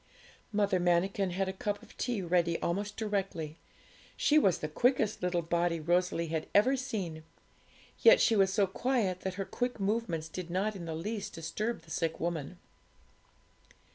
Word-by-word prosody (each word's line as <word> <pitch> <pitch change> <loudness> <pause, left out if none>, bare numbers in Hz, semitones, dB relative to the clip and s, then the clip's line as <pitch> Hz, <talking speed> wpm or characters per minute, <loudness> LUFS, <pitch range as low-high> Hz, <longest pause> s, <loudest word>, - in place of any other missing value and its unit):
Mother 200 -3 +2
Manikin 180 +3 +2
had 190 +2 -1
a 190 - -2
cup 205 +2 -3
of - - -16
tea 240 -6 -2
ready 170 -1 +1
almost 205 +4 -2
directly. 195 -7 -3 0.6
She 300 +1 +5
was 190 - +3
the 155 - -3
quickest 220 - +1
little 175 -1 0
body 170 0 0
Rosalie 175 0 +1
had 160 -1 -2
ever 245 +7 +5
seen; 195 -11 -4 0.8
yet 485 +1 +7
she 230 - +4
was 195 -2 +4
so 200 0 +3
quiet 200 -2 0
that 190 0 -4
her 195 0 -3
quick 245 +2 -3
movements 195 -6 -1
did 175 +1 -6
not 195 +4 0
in 175 -3 -6
the 160 -1 -4
least 205 +5 -4
disturb 200 +5 -3
the 160 - -15
sick 165 0 -1
woman. 170 0 -3
190 Hz, 165 wpm, -31 LUFS, 170-210 Hz, 0.8 s, yet